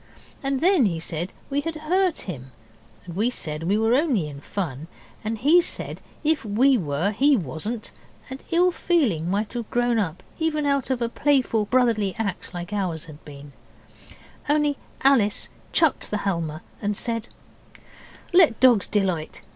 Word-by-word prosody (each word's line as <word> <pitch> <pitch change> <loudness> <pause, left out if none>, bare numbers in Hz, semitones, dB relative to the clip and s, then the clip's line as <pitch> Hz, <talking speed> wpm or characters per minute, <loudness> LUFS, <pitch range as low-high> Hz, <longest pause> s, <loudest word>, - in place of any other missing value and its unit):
And 275 -1 -1
then 345 - +4
he 165 -4 -2
said 165 +2 -3 0.2
we 285 +1 +1
had 330 +1 -4
hurt 350 +3 +1
him, 135 -8 -7 0.5
and 170 -2 -8
we 220 +5 +2
said 155 -10 -5
we 190 +6 +1
were 225 +2 +2
only 255 - +2
in 140 -1 -9
fun, 160 -5 -4 0.4
and 220 +1 -2
he 305 +10 +5
said - - -4 0.2
if 310 0 +2
we 240 +6 +3
were 165 - 0
he 275 +6 +4
wasn't, 195 - -4 0.4
and 265 0 -8
ill 355 +1 +3
feeling 250 - +1
might 205 +3 -1
have 235 -3 -5
grown 240 -1 +1
up 180 -3 -3 0.2
even 310 -2 0
out 280 -2 +1
of 250 -2 0
a - - +1
playful 250 -4 +1
brotherly 225 -4 +2
act 200 -5 -3
like 175 +3 -6
ours 180 -6 -2
had 155 -2 -13
been, 140 -1 -11 1.0
only 295 -1 +2 0.3
Alice 245 -7 +4 0.2
chucked 320 -4 +2
the 210 - -1
Halma 170 -4 -2 0.2
and 205 -1 -1
said 230 -1 -2 1.1
'Let 335 -10 +5
dogs 245 -7 +5
delight. 185 -6 -1
220 Hz, 160 wpm, -24 LUFS, 175-275 Hz, 1.1 s, he